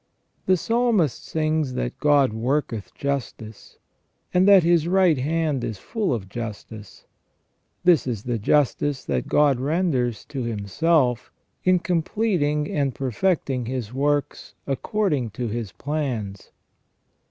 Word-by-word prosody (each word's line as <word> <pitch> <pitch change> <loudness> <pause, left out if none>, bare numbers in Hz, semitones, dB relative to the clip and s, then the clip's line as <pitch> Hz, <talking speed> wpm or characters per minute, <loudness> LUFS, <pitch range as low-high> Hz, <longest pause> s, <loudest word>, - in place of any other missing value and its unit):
* - - -45
The 185 0 +4
Psalmist 225 - +1
sings 155 -4 -1
that - - -3
God 145 -5 +3
worketh 115 -2 -2
justice, 125 -6 -5 0.6
and 180 +2 +4
that 195 -3 +7
His 170 -1 +3
right 180 -5 +3
hand 150 -1 0
is 110 - -4
full 215 - -2
of 110 -6 -2
justice; 110 -1 -8 0.8
this 175 -6 +4
is 115 -5 -3
the 120 -2 -2
justice 145 +3 +1
that - - -2
God 145 -4 +3
renders 135 - 0
to 135 -3 -5
Himself, 125 - 0 0.3
in 185 0 +4
completing 170 -4 0
and 140 -3 -1
perfecting 135 - -1
his 125 -3 -4
works 145 +2 -1
according 145 - -1
to 120 -2 -2
His 110 -3 -4
plans. 115 - -4
140 Hz, 125 wpm, -23 LUFS, 120-165 Hz, 0.8 s, that